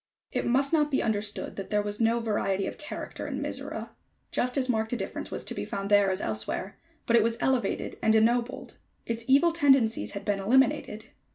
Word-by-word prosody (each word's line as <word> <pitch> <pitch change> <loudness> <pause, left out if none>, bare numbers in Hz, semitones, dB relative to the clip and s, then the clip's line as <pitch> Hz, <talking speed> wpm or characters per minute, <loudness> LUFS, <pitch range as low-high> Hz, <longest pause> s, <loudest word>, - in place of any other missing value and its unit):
It - - -1
must 275 +5 +2
not 300 -2 +3
be 275 - +1
understood 210 -1 -2
that 195 - -6
there 210 -1 +1
was 205 +2 -4
no 230 +1 +3
variety 200 -3 0
of - - -6
character 300 - -6
in - - -3
Mizora. - - -4 0.4
Just 250 +2 0
as 260 -2 +1
marked 220 -3 0
a - - 0
difference - - -5
was - - -5
to - - -4
be - - -4
found 200 +1 -4
there 205 -1 +5
as 185 - -1
elsewhere; 110 - -3 0.3
but 235 - +3
it 235 - +6
was 230 +1 0
elevated 255 -7 -1
and 220 - +3
ennobled. 235 +3 +1 0.3
Its 230 0 -3
evil 285 +6 +5
tendencies 270 -8 +3
had 200 - -6
been 205 -1 0
eliminated. 220 -1 +1
225 Hz, 200 wpm, -28 LUFS, 205-255 Hz, 0.4 s, it